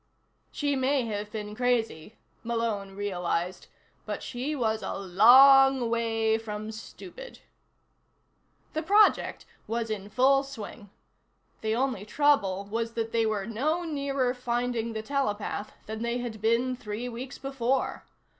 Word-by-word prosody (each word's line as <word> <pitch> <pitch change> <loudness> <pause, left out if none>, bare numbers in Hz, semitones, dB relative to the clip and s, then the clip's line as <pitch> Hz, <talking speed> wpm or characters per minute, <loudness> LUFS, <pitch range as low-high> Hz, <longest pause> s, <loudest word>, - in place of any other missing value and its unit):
She 285 -1 -1
may 265 -1 +1
have 210 -1 -4
been 210 -1 -5
crazy, 225 -6 -1 0.3
Malone 225 -4 -2
realized. 180 -3 -2 0.4
But - - -5
she 265 +5 -3
was 220 -4 0
a - - -4
long 250 +6 +6
way 225 -1 +1
from 215 -1 -6
stupid. - - -10 1.3
The 315 - -1
project 410 +6 +3 0.2
was 225 0 -2
in 205 -1 -4
full 265 +5 +4
swing. 235 -6 -9 0.7
The 220 0 0
only 250 -5 -1
trouble 210 -7 +2
was 230 +3 -3
that 225 -1 -3
they 225 -1 +2
were 210 -3 -1
no 290 - -1
nearer 280 -5 -1
finding 240 -2 -2
the 220 0 -4
telepath 215 -5 -2
than 220 +1 -6
they 235 +1 -1
had 235 -4 -5
been 235 +3 +2
three 230 0 -5
weeks 250 +3 -7
before. 270 -1 -1
230 Hz, 130 wpm, -28 LUFS, 215-265 Hz, 1.3 s, long